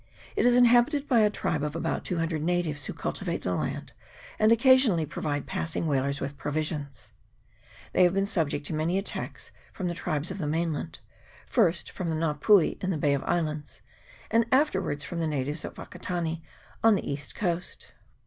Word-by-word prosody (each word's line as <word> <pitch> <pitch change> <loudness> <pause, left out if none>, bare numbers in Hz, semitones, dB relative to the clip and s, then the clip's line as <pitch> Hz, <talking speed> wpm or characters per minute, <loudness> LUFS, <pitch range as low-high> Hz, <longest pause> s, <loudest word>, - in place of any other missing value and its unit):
It - - +3
is 245 - +5
inhabited 245 +4 +4
by 245 -4 +4
a 210 -1 +5
tribe 160 -6 -2
of 150 +1 -3
about 165 - -2
two 180 - -2
hundred 165 -2 -1
natives, 165 -3 -1
who - - -4
cultivate - - -3
the - - 0
land, - - -3 0.5
and 215 +1 +5
occa 240 +3 +7
sionally 210 - +3
provide 145 0 -3
passing 165 0 -3
whalers 140 -1 0
with 140 +1 -5
provisions. 145 -3 -3 0.8
They - - +3
have 180 0 +5
been 195 0 +2
subject 160 -7 -1
to 160 - -3
many 160 +4 0
attacks 195 - -5 0.2
from 185 - -4
the 175 - -1
tribes 155 0 -2
of 190 - -6
the 155 - -2
mainland, 160 0 -2 0.5
first 175 -7 +1
from 180 -3 -4
the 160 - 0
Nga 155 -2 -1
pui 200 +1 +4
in 185 - 0
the 180 - 0
Bay 145 -1 +2
of 140 - -1
Islands, 155 -4 -2 0.5
and 230 +1 +3
afterwards 190 - +2
from 175 - -5
the 165 - 0
natives 150 +1 -2
at - - -7
Wakatane 165 -2 -4 0.4
on 225 -2 +6
the - - -3
east 140 +1 -5
coast. 180 -2 -3
165 Hz, 185 wpm, -28 LUFS, 150-195 Hz, 0.8 s, occa